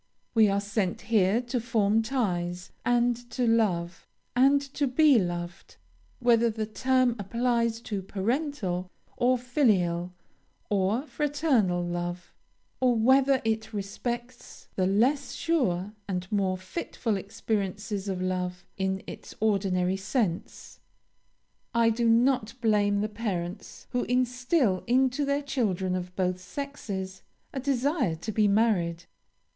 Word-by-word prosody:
We 220 -2 +6
are 200 0 +1
sent 200 -2 -2
here 215 +1 +2
to 245 +1 -2
form 220 -2 +2
ties, 180 -7 -2
and 245 0 +3
to 245 +1 -1
love, 185 -7 +1 0.3
and 275 +3 +5
to 285 - 0
be 275 0 +5
loved, 175 -2 -4 0.4
whether 235 -2 +4
the 220 -1 -3
term 255 +2 +2
applies 235 +2 0
to 205 -4 -4
parental, 195 - -2 0.3
or 250 +1 +3
filial, 195 - +1 0.6
or 205 +5 +1
fraternal 280 - +1
love 175 +1 -4 0.5
or 250 -2 +3
whether 265 +3 +4
it 220 0 -1
respects 240 +5 -5
the 185 -1 +1
less 255 +9 +2
sure 210 - 0
and 185 -1 -4
more 190 -3 +1
fitful 215 - -3
experiences 200 0 -3
of 185 -1 -2
love, 180 -1 -2
in 190 0 -1
its - - -9
ordinary 195 -3 +1
sense. 195 -2 -3 1.0
"I 230 -1 +4
do 230 +1 +1
not 235 0 +3
blame 205 -3 +2
the 210 - 0
parents 200 -4 -5
who 245 - 0
instil 250 - +1
into 260 +3 +2
their 280 +1 0
children 195 -9 -1
of 180 0 -5
both 185 -1 -1
sexes 195 -7 -6 0.3
a 270 - -2
desire 270 - 0
to 175 +7 -5
be 210 0 +3
married. 195 -6 +2
215 Hz, 125 wpm, -27 LUFS, 185-245 Hz, 1.0 s, We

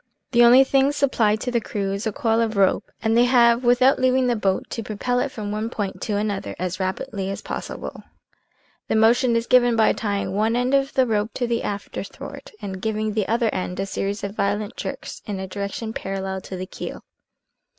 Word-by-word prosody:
" - - -54
The 240 -1 +6
only 245 +3 +8
thing 270 +1 +3
supplied 240 -7 +2
to 250 - -2
the 235 -1 +1
crew 200 -2 -3
is 200 +3 -3
a - - 0
coil 225 +2 +1
of 220 -2 -1
rope, 195 -1 +2
and 225 0 +2
they 240 +1 +5
have 240 -1 +4
(without 250 +2 +4
leaving 255 0 +3
the 245 -1 +2
boat) 195 -3 0
to 230 - -3
propel 225 +3 -1
it 275 - 0
from 210 -4 -5
one 215 +2 -2
point 205 -5 -4
to 210 -2 -1
another 205 -1 -2
as 185 +1 -3
rapidly 190 +1 -3
as 195 - -5
possible. - - -6 0.9
The - - 0
motion 235 +2 +4
is 230 0 +1
given 245 -1 +4
by 220 -1 +4
tying 200 -3 -2
one 220 +3 +1
end 250 +2 +1
of 275 0 +2
the 260 - +4
rope 215 -1 -1
to 250 - 0
the 235 -1 0
afterthwart, 200 0 -6
and 190 -2 -5
giving 215 0 -1
the 210 -2 0
other 230 0 +1
end 180 0 -3
a 195 - 0
series 200 +1 -3
of 200 +1 -4
violent 205 0 -1
jerks - - -6
in 200 -2 -3
a 190 - -4
direction 200 +3 -4
parallel 190 -1 -4
to 185 - -7
the 185 - -4
keel. - - -7
220 Hz, 215 wpm, -23 LUFS, 200-240 Hz, 0.9 s, only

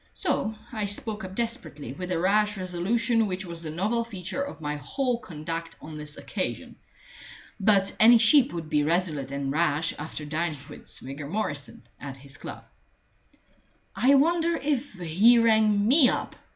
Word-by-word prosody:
So 220 - -1 0.2
I 215 -4 -2
spoke 210 +1 -2
up 190 0 -7
desperately, 230 - -4
with 180 +5 -6
the 180 - 0
rash 210 +4 +2
resolution 220 +6 +1
which 190 0 -4
was 170 -1 -4
the 160 - -5
novel 210 +9 0
feature 200 +2 -5
of 280 -8 -5
my 150 -1 -3
whole 245 - -1
conduct 165 -2 -6
on 155 - -10
this 150 0 -5
occasion. - - -4 0.8
But 195 -1 +3
any 235 +2 +8
sheep 245 +4 +5
would 165 -2 -5
be 150 -1 +1
resolute 155 -4 0
and 140 -1 -2
rash 155 0 +1
after 150 0 -6
dining 155 +1 -2
with - - -12
Swigger 140 +2 -7
Morrison 145 -10 -4 0.2
at 140 -2 -7
his 140 +1 -13
club. - - -8 1.3
"I 275 +3 +5
wonder 335 +4 +3
if 285 -3 -2
he 190 +7 +4
rang 220 -3 +4
me 270 +1 +6
up?" - - -3
185 Hz, 160 wpm, -26 LUFS, 155-230 Hz, 1.3 s, any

